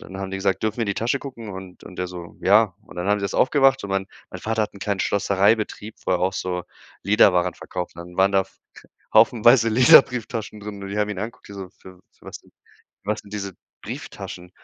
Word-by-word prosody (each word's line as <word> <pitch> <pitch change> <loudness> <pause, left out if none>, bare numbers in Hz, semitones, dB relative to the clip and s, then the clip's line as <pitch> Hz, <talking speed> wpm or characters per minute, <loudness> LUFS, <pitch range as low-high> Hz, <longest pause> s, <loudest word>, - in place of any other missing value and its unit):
Dann 95 - -10
haben 95 -1 -5
die 95 - -3
gesagt: 95 +1 0
„Dürfen 110 +2 -1
wir - - +1
in - - -1
die 100 - -1
Tasche 120 +6 -1
gucken?“ 120 -6 -8
Und 95 -1 -10
und 90 - -12
er 90 - -2
so: 85 -1 -9
„Ja.“ 105 -1 +4
Und - - -15
dann 90 +1 -3
haben 105 0 +2
sie 100 - -2
das 100 - -3
aufgemacht 135 -1 +3
und 100 - -6
mein 95 0 -1 0.2
mein - - -8
Vater 110 0 0
hat 105 - -4
'n 100 - -13
kleinen 100 +1 -1
Schlossereibetrieb, 100 +2 +1
wo - - -1
er 90 - +3
auch 90 +2 0
so 90 -1 -3 0.4
Lederwaren 90 -3 +4
verkauft 90 -1 -6
hat. 85 - -9
Dann 90 0 -14
waren 95 +1 +3
da 95 0 +4 0.7
haufenweise 115 +1 +6
Lederbrieftaschen 115 -2 +4
drin 100 -1 -8
und 100 - -6
die 100 - -4
haben 105 - +1
ihn 105 - -4
angeguckt, 115 +5 -6
die 100 - -10
so: 95 -2 -7
„Für 95 -1 -16
für - - -35
was - - -8
sind - - -26 0.5
was 105 +2 -2
sind 100 - -17
diese 100 -2 -4 0.3
Brieftaschen?“ 90 0 -8
100 Hz, 235 wpm, -23 LUFS, 95-110 Hz, 0.7 s, haufenweise